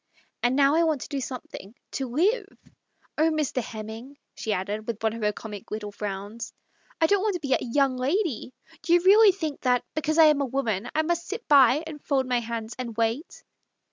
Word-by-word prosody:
And 245 +2 +2
now 280 0 +4
I 325 - +4
want 315 -5 +1
to - - -6
do 280 -1 -3
some 255 -1 -5
thing, 200 +5 -11 0.2
to 270 - -3
live. 395 - +1 0.7
Oh, 320 +1 +4
Mr. 305 -5 -1
Hemming," 225 +5 -8 0.2
she 220 - -4
added, 205 +2 -3
with 225 -2 -4
one 220 -1 +1
of 230 - -7
her 210 0 +2
comic 210 -1 -9
little 210 -1 -5
frowns, 205 +3 -6 0.2
" - - -32
I - - +6
don't 400 +3 +3
want 415 -2 0
to - - -2
be 265 - +2
a - - +2
' - - -11
young 275 -3 +3
lady 280 - -1 0.2
'! - - -23
Do 340 - +1
you 350 - +4
really 405 +3 +7
think 320 -6 -5
that 250 -2 +2
because 310 +1 -1
I 325 - +8
am 300 -2 +4
a - - +1
woman 235 -7 -1
that - - -9
I 315 - +3
must 340 +1 -1
sit 425 +4 -6
by 280 0 +6
and 305 -2 -9
fold 270 -3 +1
my 250 -1 +1
hands 230 -1 -5
and 235 -3 -5
wait 230 +7 -2
265 Hz, 235 wpm, -26 LUFS, 225-315 Hz, 0.7 s, I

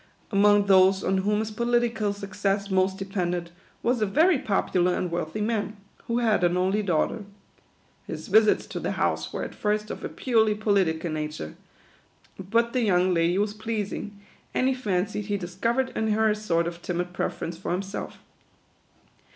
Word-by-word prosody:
Among 205 0 +5
those 190 0 +5
on 190 0 +1
whom 210 +2 +1
his 220 0 -4
political 235 -2 +1
success 200 0 -2
most 190 0 +2
depended, 180 -3 -3 0.3
was 240 -1 +1
a 215 - +2
very 315 - +4
popular 180 -4 +1
and 180 - -2
wealthy 170 +4 -3
man, 215 -1 -1 0.3
who 235 - 0
had 225 -6 +2
an 175 0 +3
only 190 +3 +1
daughter. 190 +3 0 0.8
His - - -6
visits 220 -1 +4
to - - -6
the - - -2
house - - -1
were - - -3
at - - -6
first 210 0 -1
of - - -7
a - - -3
purely 220 -4 +2
political 190 -6 +1
nature; 150 - -4 0.9
but 230 +5 0
the 255 - +1
young 185 -4 +3
lady 170 +1 +2
was 205 +1 0
pleasing, 210 -2 -4 0.4
and 255 - +2
he 265 - +3
fancied 205 -4 -2
he 205 -1 0
discovered 230 +8 -1
in 220 - 0
her 220 0 +3
a - - 0
sort 170 -6 0
of 170 0 -5
timid 180 0 -3
preference 170 -1 -3
for 175 - -5
himself. 195 +3 -4
200 Hz, 165 wpm, -26 LUFS, 180-220 Hz, 0.9 s, Among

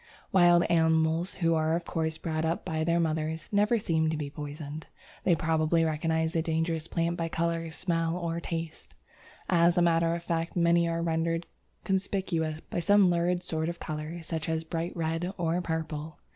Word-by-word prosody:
Wild 175 -3 +6
animals, 160 +1 +2
who 165 -2 +2
are 160 0 +2
of 170 0 -3
course 160 -1 -2
brought 155 -1 -2
up 165 +1 -1
by 160 -3 -1
their 170 +1 +2
mothers, 160 -1 -1
never 210 +3 +3
seem 160 -6 +1
to 160 - -1
be 145 -2 -4
poisoned. 150 0 -7 0.4
They 180 - +5
probably 160 +1 +2
recognize 160 +1 0
the 165 - +1
dangerous 165 0 -1
plant 170 0 -1
by 165 -1 -2
colour, 165 0 -1
smell, 165 0 -1
or 170 -1 -2
taste. 165 -1 -6 0.5
As 170 0 +4
a - - +5
matter 165 0 +3
of 170 - -6
fact, 165 0 -2
many 170 -1 +3
are 165 0 -1
rendered 165 0 0 0.4
conspicuous 185 -5 -1
by - - -4
some 195 +1 +5
lurid 175 +1 +1
sort 160 0 -2
of 170 - -6
colour, 155 +2 -5
such 160 -1 -4
as 160 0 -1
bright 165 +2 -4
red 165 +3 -1
or 170 0 0
purple. 160 -2 -4
165 Hz, 175 wpm, -29 LUFS, 160-170 Hz, 0.5 s, Wild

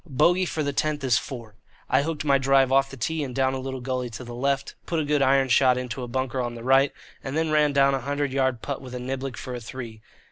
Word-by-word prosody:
Bogey 175 +7 +3
for 155 - -2
the 145 0 -2
tenth 150 0 -1
is 130 -2 +3
four. 115 -5 -8 0.3
I 130 - +3
hooked 155 0 -3
my 140 -1 +4
drive 135 -1 +3
off 135 0 +4
the 135 - -10
tee 155 +6 -1
and 130 -3 -6
down 130 -1 +2
a 135 - -3
little 130 0 -5
gully 125 -1 -2
to 115 +2 -8
the 120 -1 -8
left, 140 +2 -1
put 165 - 0
a 155 - -1
good 145 -1 +1
iron 135 0 +4
shot 125 0 +4
into 125 -1 -4
a 125 - -4
bunker 130 +1 -2
on 120 -1 -3
the 115 - -8
right, 135 +2 +4 0.3
and 135 +3 -3
then 160 -1 0
ran 150 -1 +4
down 140 0 +4
a 135 - -1
hundred 145 +1 -2
yard 130 -3 0
putt 140 -2 -4
with 125 -2 -8
a - - -4
niblick 130 0 -4
for 125 - -6
a 125 - -4
three. 115 -2 -8
135 Hz, 270 wpm, -25 LUFS, 125-140 Hz, 0.3 s, my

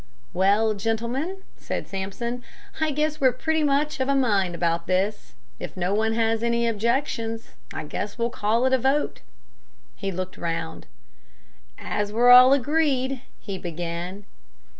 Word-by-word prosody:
"Well, 205 +4 +3
gentlemen," 235 - -2
said - - -4
Sampson, 205 +6 -4 0.4
"I 315 -1 +1
guess 300 +1 -1
we're 260 -2 +5
pretty 315 +6 -1
much 295 0 +1
of 260 +1 0
a 275 - +3
mind 200 -9 +2
about 170 0 0
this. 195 +3 -1 0.3
If - - -7
no 180 +2 0
one 220 +1 +1
has 225 0 +1
any 235 0 +1
objections, 230 0 -1 0.2
I - - -4
guess 205 +8 -5
we'll 235 0 0
call 225 +4 +1
it 260 - +2
a 260 - +4
vote." 270 +4 +1 0.8
He 195 - -3
looked 185 0 -5
round. 90 - -4 0.9
"As 205 0 -2
we're 240 +3 +5
all 250 +1 +10
agreed 275 -2 +1
" - - -37
he 195 -3 -5
began. 175 +3 -5
225 Hz, 150 wpm, -25 LUFS, 195-260 Hz, 0.9 s, all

